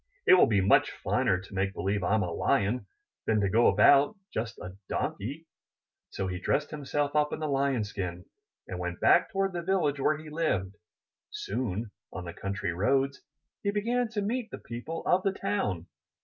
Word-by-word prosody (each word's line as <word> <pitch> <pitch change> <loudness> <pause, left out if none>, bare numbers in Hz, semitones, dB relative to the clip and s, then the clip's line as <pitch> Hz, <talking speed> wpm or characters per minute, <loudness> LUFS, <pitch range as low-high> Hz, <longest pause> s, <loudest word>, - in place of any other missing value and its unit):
'It - - +7
will 185 - +7
be 105 -3 +3
much 95 - +4
finer 95 -2 +2
to 95 +2 -13
make 95 0 -1
believe 100 +1 -1
Fm 100 +2 +1
a - - -4
Lion, 100 +7 +1 0.4
than 110 -1 +3
to 100 -2 +1
go 115 +2 +5
about 135 - +5 0.2
just 115 +1 -3
a 90 +1 -8
Donkey.*' 140 +11 -3 0.6
So 95 - -3
he 90 -1 -3
dressed 145 +9 0
himself 145 0 -2
up 150 0 +3
in - - -2
the 155 - -2
Lion's 135 -6 0
skin, 90 -3 -5 0.4
and 90 - -5
went 90 -1 -4
back 175 - +5
toward 195 -1 0
the 175 - -2
village 170 -6 +1
where 150 +2 +2
he 155 0 -10
lived. 105 - -1 0.5
Soon 120 - -3 0.2
on 90 - -6
the 85 - -6
country 95 -2 -3
roads 135 +9 +1 0.4
he 200 - 0
began 235 +4 0
to 215 -2 -3
meet 230 +2 -2
the - - -7
people 120 +8 -6
of 180 - +3
the 195 0 0
town. 100 - -2
125 Hz, 185 wpm, -29 LUFS, 95-160 Hz, 0.6 s, It